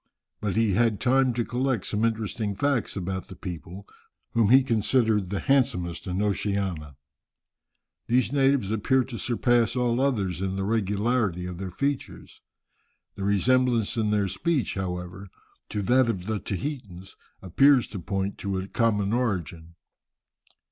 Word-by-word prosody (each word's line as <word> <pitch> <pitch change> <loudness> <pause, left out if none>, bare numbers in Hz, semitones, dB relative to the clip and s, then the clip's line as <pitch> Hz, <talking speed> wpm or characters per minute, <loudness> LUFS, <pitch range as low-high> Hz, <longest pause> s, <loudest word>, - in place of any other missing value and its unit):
But 105 -3 -2
he 110 -2 +2
had 115 0 +2
time 130 0 +3
to 120 -1 0
collect 125 -4 -1
some 105 +1 -1
interesting 110 -2 -1
facts 140 0 0
about 95 -1 -4
the - - -10
people, 90 +2 -8 0.5
whom 115 -3 +2
he 130 +2 +7
considered 110 -4 +1
the 100 0 -2
handsomest 90 - 0
in 95 +3 -1
Oceania. 100 -8 -2 1.1
These 125 +1 +2
natives 135 -7 +2
appear 125 +5 +2
to 120 -2 -7
surpass 120 -1 +1
all 125 0 +1
others 100 - 0
in 95 0 -2
the 95 - -2
regularity 105 -2 0
of 90 -1 -6
their 95 -1 -4
features. 140 +9 -4 0.7
The 95 - -6
resemblance 120 +3 +2
in 110 -2 0
their 105 -1 +1
speech, 140 - -1
however, 90 0 -5 0.4
to 105 - -3
that 125 +4 +3
of 95 -6 -3
the 110 0 -2
Tahitans, 95 - -6 0.3
appears 130 +7 +4
to 100 - -6
point 95 +2 -3
to 100 -1 -2
a 95 +1 -4
common 105 -2 +1
origin. 85 - -2
105 Hz, 145 wpm, -26 LUFS, 95-125 Hz, 1.1 s, he